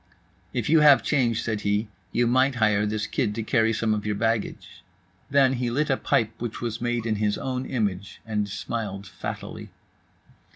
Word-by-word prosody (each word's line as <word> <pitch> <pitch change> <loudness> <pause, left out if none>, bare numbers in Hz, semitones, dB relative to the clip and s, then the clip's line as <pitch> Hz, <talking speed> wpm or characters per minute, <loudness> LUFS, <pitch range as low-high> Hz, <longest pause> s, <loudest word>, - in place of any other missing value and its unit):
"If 120 -3 -2
you 160 +1 +5
have 145 -2 +7
change," 120 -6 +1
said 110 -2 -2
he, 105 +2 0 0.2
"you 120 - +2
might 130 +3 +3
hire 105 -3 +2
this 105 0 -2
kid 105 - -1
to 115 - -2
carry 115 0 +2
some 110 0 +1
of 105 -1 -2
your 105 -1 -1
baggage." 115 0 -2 0.5
Then 135 -2 +4
he 125 -1 -1
lit 145 +4 0
a - - +4
pipe 110 -1 +1
which 120 -2 -4
was 115 -1 -4
made 120 -1 -1
in 110 -2 0
his 105 0 0
own 130 0 -3
image, 100 -6 -2
and 105 -2 -1
smiled 100 -1 -4
fattily. - - -7
115 Hz, 180 wpm, -25 LUFS, 105-125 Hz, 0.5 s, have